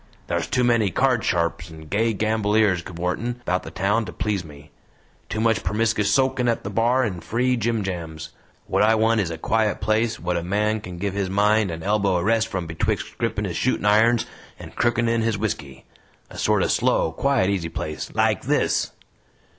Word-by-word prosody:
Thar's - - -1
too 125 - +1
many 115 -4 +3
card 125 +5 +1
sharps 85 0 -1
and 80 -1 -12
gay 110 +6 +1
gamboliers 105 -3 +1
cavortin' 90 +8 -3
about 90 -5 -1
the - - -9
town 105 +4 0
to 90 - -7
please 100 +2 -2
me. 75 -1 -14 0.6
Too 110 - -3
much 115 0 +2
permiskus 110 -1 +1
soakin' 130 -2 +2
at 115 - 0
the 100 - -5
bar 120 +5 +2
and 90 -8 -3
free 125 +3 +1
jimjams. 90 -9 -3 0.4
What - - 0
I 110 +2 +5
want 110 0 +3
is 90 - -2
a 85 - -5
quiet 110 +5 0
place 110 +1 0
what 90 0 -1
a - - -1
man 105 +4 0
kin 90 -3 -8
give 100 +2 -2
his 100 -2 -2
mind 105 +1 +2
and 80 -1 -6
elbow 100 -2 +1
a 85 - -1
rest 110 +2 +2
from 90 -5 -4
betwixt 80 0 -2
grippin' - - -1
his - - -3
shootin' - - 0
irons 110 +3 +4 0.3
and - - -11
crookin' 120 0 +1
in 115 0 +1
his 110 -1 0
whisky. 70 -11 -4 0.5
A - - -10
sort - - +2
o' - - +1
slow, 80 - +1
quiet, 120 +1 +1
easy 90 -4 -2
place 75 -1 -5
LIKE - - +2
THIS." - - +1
105 Hz, 195 wpm, -23 LUFS, 90-115 Hz, 0.6 s, I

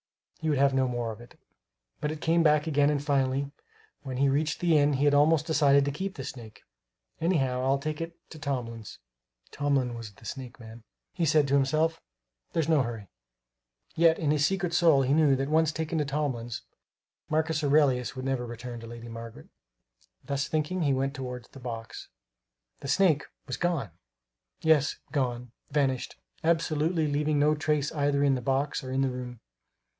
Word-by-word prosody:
He 160 - -1
would 145 - +2
have 140 0 +4
no 130 -1 +2
more 120 -2 -2
of 110 - -10
it. 120 - -16 0.6
But 150 - -2
it 155 - -6
came 170 +1 +3
back 150 -1 +4
again 145 -2 +3
and 145 -1 0
finally, 140 -1 +1 0.5
when 130 -3 -5
he 140 +1 +3
reached 145 +2 0
the 170 -2 +3
inn, 145 -1 +4
he 140 +2 +1
had 145 - +4
almost 150 +1 +4
decided 140 -3 +4
to 140 - 0
keep 190 +7 -4
the 135 - -6
snake. 115 -5 -9 0.6
"Anyhow 135 -7 +1
I'll 135 +1 +2
take 155 +2 -4
it 165 0 -6
to 160 - -10
Tomlin's" 120 -6 -4 0.5
(Tomlin 140 -4 0
was 115 -3 -7
the 105 - -18
snake 130 0 -7
man), 115 0 -11 0.3
he 165 - 0
said 150 -1 +4
to 135 - -1
himself; 155 +4 +2 0.5
"there's 165 -3 +1
no 160 -3 +4
hurry." 115 -6 -5 0.8
Yet 165 0 +4
in 150 -3 0
his 150 -1 +2
secret 180 0 0
soul 160 -6 +5
he 130 +2 +2
knew 150 -3 +4
that 135 +1 -2
once 160 0 +3
taken 160 +1 -2
to 150 - +1
Tomlin's, 135 -5 -3 0.7
Marcus 155 0 0
Aurelius 140 -4 +3
would 130 0 -5
never 130 -2 -1
return 120 +1 -7
to 115 - -9
Lady 120 0 -9
Margaret. 115 -9 -9 0.7
Thus 140 0 -2
thinking, 160 +4 -1
he 140 -4 +2
went 135 +1 -1
toward 125 -3 -6
the - - -12
box. 115 -3 -7 0.7
The - - -7
snake 155 -1 +3 0.2
was 130 - -4
gone! 165 - -1 0.7
Yes, 155 -3 +3 0.2
gone, 125 -4 -2 0.2
vanished 135 -3 0 0.3
absolutely, 160 0 +1
leaving 150 +1 0
no 150 +1 +4
trace 150 -1 0
either 145 -1 +1
in 140 -1 +4
the 130 - -1
box 135 +4 -1
or 130 - -6
in 135 +1 +1
the 135 - 0
room. 125 -2 -7
140 Hz, 180 wpm, -28 LUFS, 130-155 Hz, 0.8 s, soul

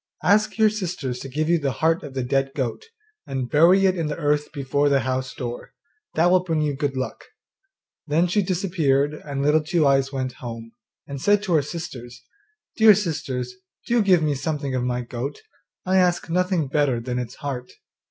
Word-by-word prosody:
Ask 210 +3 +3
your 220 -1 +4
sisters 175 - -4
to 135 - -7
give 155 +4 -1
you 170 0 +3
the 140 -3 -1
heart 160 +8 +1
of 140 -3 -9
the 130 - -1
dead 135 +2 0
goat, 130 -5 -3 0.4
and 130 -3 -3
bury 175 +6 +5
it 190 -1 +3
in 165 -3 -2
the 150 - -4
earth 150 -1 0
before 145 0 0
the 140 -1 +3
house 130 +1 -2
door; 120 -1 -6 0.4
that 170 +2 +4
will 185 0 +4
bring 165 -3 -1
you 150 -2 0
good 140 -1 -2
luck.' 130 - -4 0.8
Then 155 +4 +2
she 185 +4 +1
disappeared, 165 -7 +1
and 140 -2 -5
Little 150 +2 +4
Two 160 0 +1
eyes 135 -1 +3
went 130 -2 -2
home, 115 -2 -7 0.3
and 140 -1 -7
said 205 +3 +3
to 185 -4 -1
her 155 - +4
sisters, 135 -6 -8 0.5
'Dear 220 -2 +8
sisters, 145 -10 -3 0.3
do 240 -1 +2
give 185 -5 +4
me 150 -1 +1
something 145 -1 -3
of 130 -1 -1
my 125 0 -1
goat; 120 +3 -5 0.5
I 185 +1 +2
ask 175 -2 +2
nothing 180 -3 +1
better 140 -3 +1
than 125 +1 -3
its 125 0 -6
heart. 135 -4 -5
145 Hz, 190 wpm, -23 LUFS, 130-175 Hz, 0.8 s, Dear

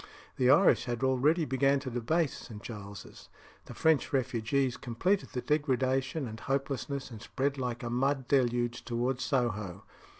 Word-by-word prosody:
The 125 -1 +3
Irish 145 -3 +5
had 120 0 -3
already 140 +6 +3
begun 135 +1 +2
to 130 -2 -5
debase 140 +6 0
St. 105 -3 -10
Giles's; 100 -4 -9 0.4
the - - -10
French 160 -3 +2
refugees 130 0 0
completed 180 - -1
the 125 - -2
degradation 135 -1 0
and 110 0 -8
hopelessness, 135 0 -3
and 110 -2 -9
spread 140 +3 -2
like 120 -2 -3
a 120 - -3
mud 135 +1 0
deluge 120 -3 +1
towards 125 +2 -1
Soho. 105 - -1
130 Hz, 145 wpm, -30 LUFS, 120-140 Hz, 0.4 s, Irish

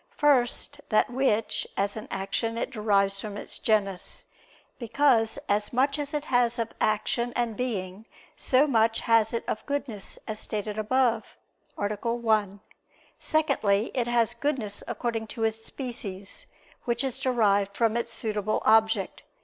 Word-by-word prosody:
First, 285 0 +2
that 215 +2 +3
which, 240 -4 +1
as 200 +1 0
an 220 +3 -6
action, 225 +4 -2
it 250 - -2
derives 200 -4 +1
from 205 -2 -6
its - - -6
genus; 200 -4 0 0.5
because 235 -1 +2
as 205 +1 0
much 275 +4 +1
as 285 -1 -2
it 295 - -1
has 245 -3 +2
of 230 -1 -2
action 215 +3 +1
and 235 -2 0
being 210 -4 -4 0.3
so 260 +3 +3
much 225 -5 +2
has 225 -1 +3
it 230 - -2
of - - -2
goodness, 280 -8 -3
as 215 -1 -3
stated 210 0 -3
above 230 0 +1 0.4
(A. - - -1 0.3
1). 215 -4 0 0.6
Secondly, 235 -10 +1
it 245 -2 0
has 235 -1 +2
goodness 235 -5 -2
according 230 -1 -2
to 225 +1 -5
its 225 0 -1
species; 220 -8 -5 0.4
which 235 +1 0
is 265 -3 0
derived 205 -6 +2
from 225 -1 +2
its 235 0 -1
suitable 215 -2 -1
object. 220 0 +3
225 Hz, 145 wpm, -27 LUFS, 210-245 Hz, 0.6 s, that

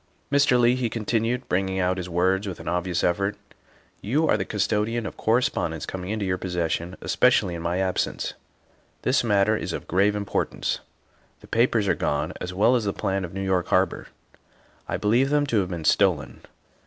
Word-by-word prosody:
" - - -40
Mr. 140 -3 +4
Leigh," 120 0 +5
he 125 -2 -1
continued, 115 +2 -1
bringing 95 +1 0
out 95 0 +1
his 90 -1 -5
words 95 +4 +1
with 95 - -5
an - - -10
obvious 90 0 -1
effort, 100 +4 0 0.3
" - - -33
you 150 +9 +1
are - - +4
the 100 - -1
custodian 105 +3 -1
of - - -6
cor 110 +2 +2
respondence 80 - -2
coming 90 0 -6
into 110 -1 -2
your 90 -1 -1
possession, 90 0 -2
especially 90 - +3
in 85 - -5
my 85 +2 -1
absence. 95 -1 -1 0.7
This 125 0 +2
matter 105 -1 +3
is - - -3
of - - -6
grave 100 +3 +2
importance. 100 -1 -2 0.6
The - - -15
papers 115 -3 +2
are - - +4
gone 75 - -1
as 90 - -4
well 105 +7 +3
as 115 -4 0
the 100 - 0
plan 95 0 -1
of 90 +1 -7
New 95 - -3
York 95 -3 +1
Har - - +4
bor. - - -10 0.8
I - - -2
believe 120 +6 +2
them 145 0 +2
to 120 -6 +1
have 95 -2 -1
been 85 -3 -5
stolen. 85 -10 +2
100 Hz, 200 wpm, -25 LUFS, 90-115 Hz, 0.8 s, Leigh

